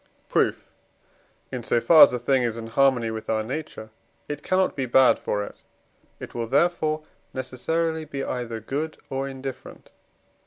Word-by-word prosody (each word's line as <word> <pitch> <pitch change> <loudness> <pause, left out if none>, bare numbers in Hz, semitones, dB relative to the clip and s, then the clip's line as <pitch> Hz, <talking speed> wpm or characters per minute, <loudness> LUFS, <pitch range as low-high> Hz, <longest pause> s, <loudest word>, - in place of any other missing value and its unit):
Proof. - - +1 0.8
In 125 -2 -4
so 120 - +1
far 160 +6 +6
as - - +10
a 125 - -1
thing 130 +2 +2
is 115 -2 -1
in 115 - -6
harmony 120 -1 +2
with 110 0 -6
our 110 -1 +1
nature, 130 -3 -6 0.4
it 145 0 -5
cannot 185 0 +1
be 135 -2 -2
bad 130 +2 +5
for 105 0 -2
it. - - -10 0.6
It - - -9
will 115 -1 -3
therefore 155 +2 +1 0.3
necessarily 160 +5 -2
be 140 -2 -5
either 120 -2 -4
good 145 +8 -4
or 135 0 -2
indifferent. 135 -1 -8
130 Hz, 160 wpm, -25 LUFS, 115-155 Hz, 0.8 s, as